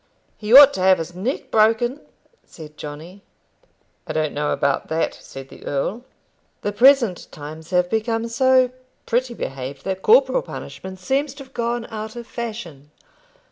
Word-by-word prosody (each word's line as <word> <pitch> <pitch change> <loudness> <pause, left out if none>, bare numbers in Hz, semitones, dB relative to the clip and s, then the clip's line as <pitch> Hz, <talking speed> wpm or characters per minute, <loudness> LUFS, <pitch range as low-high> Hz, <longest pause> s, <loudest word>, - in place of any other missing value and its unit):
"He 210 0 -6
ought 285 +2 +10
to 185 - -4
have 185 0 +5
his 165 +1 -6
neck 210 +10 -4
broken," 225 +5 +2 0.4
said 155 -2 -13
Johnny. 155 +7 -9 0.9
"I - - -4
don't 155 -1 -1
know 150 0 -1
about 140 -1 0
that," 160 +1 -1
said 135 0 -11
the - - -14
earl. 195 - -3 0.6
"The 205 - -1
present 240 -4 +4
times 155 +2 -10
have 180 -1 +2
become 225 +3 -1
so 255 +1 +3 0.3
pretty 245 +1 -1
behaved 135 - -6
that 190 0 -3
corporal - - +4
punishment 190 - -9
seems 270 +8 -1
to 275 - -9
have 265 0 -21
gone 235 0 -2
out 220 0 -6
of 240 -1 -7
fashion. 215 - -7
215 Hz, 155 wpm, -21 LUFS, 160-240 Hz, 0.9 s, ought